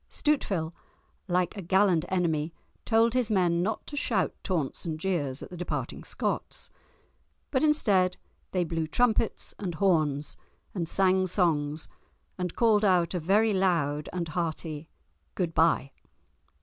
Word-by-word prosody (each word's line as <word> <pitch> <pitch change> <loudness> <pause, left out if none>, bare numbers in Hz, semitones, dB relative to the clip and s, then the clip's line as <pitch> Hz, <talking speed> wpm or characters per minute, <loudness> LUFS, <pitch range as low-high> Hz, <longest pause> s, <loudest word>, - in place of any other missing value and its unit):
Stuteville, 195 - 0 0.5
like 180 +1 +1
a 200 - -5
gallant 185 -2 +3
enemy, 165 -3 0 0.3
told 225 0 +3
his 250 -3 +1
men 175 -4 +2
not 210 +4 -2
to 295 - -7
shout 220 -9 0
taunts 160 -8 -2
and 160 -2 -3
jeers 155 -7 -2
at - - -10
the - - -7
departing 180 - -4
Scots. - - -4 0.8
But 265 +1 +1
instead 200 -12 +3 0.3
they 180 -2 0
blew 165 -1 -2
trumpets 225 +4 +1
and 180 -5 -3
horns, 155 -6 +1 0.4
and 170 -4 -3
sang 190 -1 +3
songs, 155 -5 0 0.5
and 180 -2 -4
called 220 -3 +4
out 180 -4 +3
a 180 - 0
very 205 +6 +3
loud 165 -6 +1
and 175 -2 -3
hearty 160 -2 -3 0.5
"Good 170 -3 -1
bye." 160 -5 +3
180 Hz, 135 wpm, -28 LUFS, 160-200 Hz, 0.8 s, called